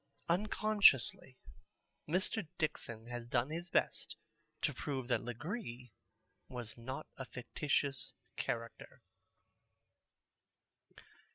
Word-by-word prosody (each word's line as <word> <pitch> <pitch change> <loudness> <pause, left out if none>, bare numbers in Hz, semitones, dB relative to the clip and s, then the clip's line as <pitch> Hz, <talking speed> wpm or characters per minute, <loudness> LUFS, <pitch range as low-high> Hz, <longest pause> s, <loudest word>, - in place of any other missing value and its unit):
Unconsciously 200 - +4 0.7
Mr. 185 +2 +1
Dixon 115 -7 -1
has 120 0 -5
done 130 +2 +2
his 170 +2 -3
best - - +1 0.5
to - - +3
prove 135 -4 -2
that 125 - +3
Legree 125 - -4 0.6
was 120 -3 -5
not 130 +5 -5
a 130 - -4
fictitious 140 +2 0 0.2
character. 115 0 -4
130 Hz, 85 wpm, -36 LUFS, 120-165 Hz, 0.7 s, Unconsciously